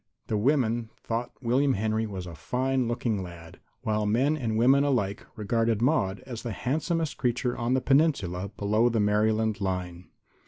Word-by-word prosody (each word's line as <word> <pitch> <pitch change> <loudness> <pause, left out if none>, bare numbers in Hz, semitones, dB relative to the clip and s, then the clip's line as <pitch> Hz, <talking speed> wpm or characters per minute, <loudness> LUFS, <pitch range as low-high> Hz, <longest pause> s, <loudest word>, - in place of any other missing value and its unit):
The 110 - -2
women 120 -1 +1
thought 120 +2 -3
William 130 +3 +2
Henry 110 +2 0
a 95 -5 -6
fine 130 +7 -1
looking 115 -3 -1
lad, 85 -2 -10 0.2
while 105 -1 0
men 130 +8 +2
and 115 -7 -2
women 135 +4 +5
alike 115 -9 0
regarded 115 +1 0
Maude 115 -7 +1
as 125 -3 -7
the 120 -3 -4
handsomest 160 - -1
creature 125 0 0
on 120 +2 0
the 130 - +1
Peninsula 105 - +2
below 110 +4 +2
the 115 -1 0
Maryland 110 +1 +1
line. 90 -2 -3
115 Hz, 155 wpm, -27 LUFS, 105-130 Hz, 0.2 s, women